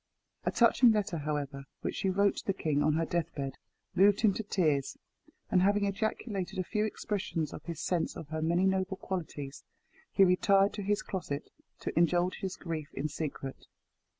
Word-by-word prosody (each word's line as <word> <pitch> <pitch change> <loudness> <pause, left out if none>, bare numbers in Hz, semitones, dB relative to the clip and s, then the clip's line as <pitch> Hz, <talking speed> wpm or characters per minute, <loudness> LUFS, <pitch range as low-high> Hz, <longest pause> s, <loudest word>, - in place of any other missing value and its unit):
A - - +2
touching 235 0 +6
letter, 210 -4 0
however, 145 -2 -3 0.2
which - - -2
she 190 - 0
wrote 200 +2 +2
to - - -6
the 195 - +1
king 150 -5 0
on 150 +1 +3
her 165 +1 +1
death 170 -1 -1
bed, 135 -2 -4 0.3
moved 200 +2 +5
him 215 -3 +5
to 220 - -2
tears; 155 -10 0 0.5
and 180 - +5
having 200 +2 +3
ejaculated 200 -1 -2
a 185 - +1
few 210 +3 0
expressions 195 -7 -2
of - - -7
his 170 -3 -5
sense 175 0 -1
of 150 - -8
her 160 0 -3
many 170 +4 +2
noble 190 0 +1
qualities, 150 -8 -5 0.5
he 195 - +5
retired 195 +2 +4
to 210 - -4
his 205 +1 0
closet 155 -7 -4 0.3
to - - -4
indulge 175 +2 +3
his 190 -1 -3
grief 160 -4 -5
in 145 +3 -2
secret. 145 -3 -5
180 Hz, 180 wpm, -31 LUFS, 155-200 Hz, 0.5 s, touching